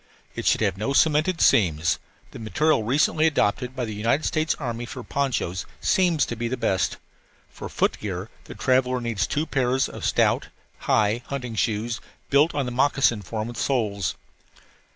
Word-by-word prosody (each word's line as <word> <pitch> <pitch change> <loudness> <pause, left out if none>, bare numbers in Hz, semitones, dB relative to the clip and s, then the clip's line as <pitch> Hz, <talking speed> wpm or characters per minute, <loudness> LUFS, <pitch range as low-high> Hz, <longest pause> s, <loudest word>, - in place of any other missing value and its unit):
It - - -4
should - - +3
have 100 -3 +1
no 110 +7 -1
cemented 160 +4 +3
seams; 80 -6 +3 0.3
the - - -9
material 145 +5 +1
recently 150 +7 +2
adopted 125 -3 0
by 125 -2 -2
the 110 - -5
United 115 +8 0
States 155 0 0
Army 120 -3 -4
for 125 - -7
ponchos 125 -11 -2
seems 175 -6 +2
to 120 - -5
be 120 +1 -3
the 130 +2 -2
best. 100 -5 0 0.5
For - - -8
footgear 95 0 -2
the - - -10
traveller 130 -1 +2
needs 115 -4 -1
two 150 +2 -1
pairs 130 -3 +1
of - - -9
stout, - - +2 0.4
high 110 +2 +3
hunting 125 -4 -4
shoes, 115 +1 -1 0.3
built 145 +4 +4
on 140 -2 0
the 125 - -4
moccasin 130 -3 +2
form 110 +4 -4
with 120 -1 -8
soles. 105 -9 -1
120 Hz, 165 wpm, -24 LUFS, 110-140 Hz, 0.5 s, built